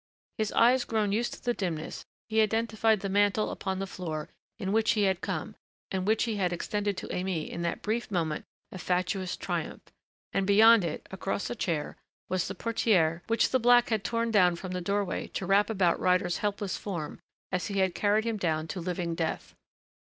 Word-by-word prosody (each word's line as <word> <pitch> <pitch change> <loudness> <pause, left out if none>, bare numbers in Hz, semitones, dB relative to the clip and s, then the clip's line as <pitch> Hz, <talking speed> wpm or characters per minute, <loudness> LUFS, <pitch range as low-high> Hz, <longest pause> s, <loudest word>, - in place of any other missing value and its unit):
His 215 -1 0
eyes 245 +2 +5
grown 215 -3 0
used 230 +4 0
to - - -18
the 245 - +1
dimness 170 -7 -4 0.2
he 220 0 +3
identified 220 -1 +2
the 200 - -2
mantle 205 +2 +2
upon 190 -1 -3
the 195 - -2
floor 160 -5 -5 0.3
in 190 - -3
which 220 +1 +3
he 210 -2 +1
had 190 -2 +1
come - - -4 0.4
and 190 0 -2
which 220 +1 +3
he 225 -3 -1
had 180 -3 +1
extended 205 +3 -2
to - - -5
Aimée 180 -4 -2
in 170 - -5
that 170 0 -2
brief 225 +3 -1
moment 165 -6 -1 0.3
of 185 - -7
fatuous 185 +1 -1
triumph, - - -4 0.5
and 195 -1 +1
beyond 220 +1 +7
it, 165 -3 -4
across 195 +3 -3
a - - -3
chair, 165 -9 -2 0.3
was 185 -1 0
the 195 - -5
portière 180 -7 +2
which 230 0 +2
the 260 - +3
black 245 0 +5
had 220 -3 0
torn 230 0 -1
down 180 -5 +4
from 185 +1 -7
the 180 0 -3
doorway 200 +1 -1
to 190 - -2
wrap 200 +3 +3
about 190 -6 +2
Ryder's 180 -1 +2
helpless 205 -1 -2
form 170 -8 -5 0.3
as 180 -1 -1
he 200 -2 -3
had 190 -2 +2
carried 210 +2 +2
him 230 -2 -1
down 160 -4 -1
to 185 - -4
living 175 -1 -2
death. 165 -1 -3
195 Hz, 195 wpm, -29 LUFS, 180-220 Hz, 0.5 s, beyond